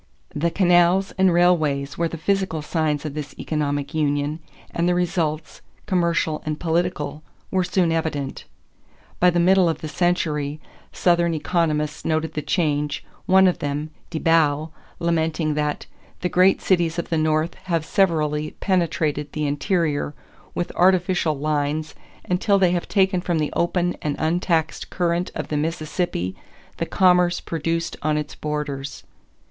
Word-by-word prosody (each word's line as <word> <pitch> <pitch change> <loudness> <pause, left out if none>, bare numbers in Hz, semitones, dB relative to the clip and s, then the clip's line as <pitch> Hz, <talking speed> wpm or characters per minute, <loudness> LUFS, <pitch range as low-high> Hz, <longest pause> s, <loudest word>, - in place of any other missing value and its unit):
The 155 +3 0
canals 180 +1 +3
and 190 -1 +4
railways 155 -6 +2
were 170 - 0
the 165 - -6
physical 190 -3 -1
signs 150 -2 -1
of 150 - -4
this 150 -1 -6
economic 145 -1 -2
union, 145 0 0 0.3
and 170 +1 0
the 180 - +2
results, 165 -3 -1 0.2
commercial 170 -5 0
and 155 0 -3
political, 165 -3 -1 0.3
were 185 -1 +2
soon 180 -1 +1
evident. 155 -4 -2 0.7
By 180 - +6
the 175 0 +1
middle 185 0 +4
of 160 -1 -3
the 155 - -4
century, 155 -3 0 0.3
Southern 170 -2 +2
economists 150 -2 -1
noted 160 0 -1
the 150 - -2
change, 150 -1 -1 0.2
one 190 +1 +6
of 180 - +2
them, 145 +2 -3 0.2
De 165 - -4
Bow, 155 -1 +2 0.3
lamenting 160 -2 0
that 150 0 -2 0.4
"the 180 - 0
great 185 +2 +4
cities 170 -3 +2
of 170 - -3
the 165 - +1
North 155 +2 +1
have 165 -4 0
severally 155 -5 +1
penetrated 160 -6 0
the 150 -1 -1
interior 145 0 0 0.4
with 175 - -2
artificial 180 -3 +3
lines 150 +1 -1 0.3
until 200 +3 +2
they 185 -2 +3
have 175 -1 -1
taken 190 -2 +2
from 175 -2 -1
the 150 -1 -1
open 175 +1 0
and 145 -2 -1
untaxed 160 -1 0
current 175 0 0
of - - -4
the 150 - -1
Mississippi 155 - -2 0.4
the - - -2
commerce 180 -2 +3
produced 165 +1 -2
on 150 0 +1
its 150 -1 -4
borders." 145 -2 -4
165 Hz, 145 wpm, -23 LUFS, 150-175 Hz, 0.7 s, By